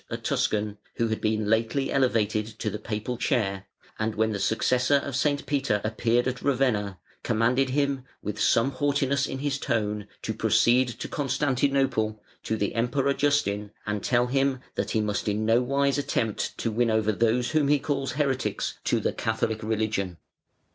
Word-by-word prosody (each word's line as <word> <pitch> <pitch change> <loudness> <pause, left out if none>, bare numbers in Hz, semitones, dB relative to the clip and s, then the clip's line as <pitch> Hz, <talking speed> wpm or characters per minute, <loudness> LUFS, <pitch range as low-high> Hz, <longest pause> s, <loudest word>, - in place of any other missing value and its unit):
a - - -3
Tuscan, 105 -1 -1 0.2
who 115 -1 0
had 110 - -2
been 110 0 0
lately 115 +5 +1
elevated 110 -5 +1
to 110 -1 -4
the 105 - -5
Papal 110 +3 -4
chair, 100 -8 -1 0.3
and 110 0 -1
when 110 +1 +1
the 100 - -3
successor 125 +6 +2
of 140 -1 -1
St. 145 +2 +1
Peter 140 -7 0
appeared 115 +3 +1
at 125 -1 -3
Ravenna 120 -8 +1 0.2
commanded 120 +4 +2
him, 140 -1 0 0.2
with 105 0 -4
some 115 +4 +3
haughtiness 140 -1 +1
in - - -4
his 140 0 -2
tone, 105 -5 -1 0.2
to - - -2
proceed 125 +2 +3
to 120 - -6
Constantinople, 135 -5 0 0.2
to 110 - -2
the 100 -1 -1
Emperor 130 +4 +1
Justin, 130 -8 +1 0.2
and 105 -1 -2
tell 120 -1 +2
him 135 +1 +1
that - - -2
"he 110 - +1
must 105 0 -2
in 105 +1 0
no 115 +2 +4
wise 140 +2 +1
attempt 115 -6 -1
to 115 - -1
win 115 +2 +1
over 110 -1 +2
those 115 +3 +1
whom 155 -2 +2
he 145 +1 +4
calls 140 -2 -2
heretics 135 -2 -1
to - - +1
the - - -1
Catholic 110 0 -1
religion". 110 -5 -1
120 Hz, 170 wpm, -26 LUFS, 110-135 Hz, 0.3 s, no